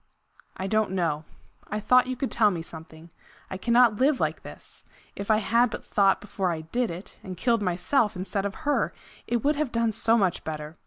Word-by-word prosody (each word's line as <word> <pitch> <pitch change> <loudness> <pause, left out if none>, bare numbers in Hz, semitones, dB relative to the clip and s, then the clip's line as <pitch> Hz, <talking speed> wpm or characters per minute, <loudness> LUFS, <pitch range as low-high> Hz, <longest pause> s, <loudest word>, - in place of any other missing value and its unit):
"I 190 - -3
don't 215 -1 +1
know. 165 -4 -1 0.4
I 210 - -3
thought 250 +4 +4
you 255 - -2
could 260 +1 -3
tell 215 -3 +4
me 170 -4 -4
something. 160 0 -12 0.4
I 190 - -3
cannot 235 +1 +4
live 270 +2 +3
like - - -1
this! - - -12 0.3
If 200 +1 -6
I 215 - +5
had 230 +3 +2
but - - -7
thought 195 -2 +3
before 195 -3 -2
I 160 -2 -3
did 235 +9 -2
it, 175 +4 -9
and 185 -2 -7
killed 230 +1 +1
myself 200 +5 +1
instead 195 +2 -3
of 195 - -8
her! 290 - +1 0.3
It 240 -2 -1
would 295 +1 +2
have 300 -4 -1
done 230 -1 +1
so 225 +2 +3
much 190 -5 0
better! 155 0 -6
210 Hz, 205 wpm, -26 LUFS, 180-235 Hz, 0.4 s, I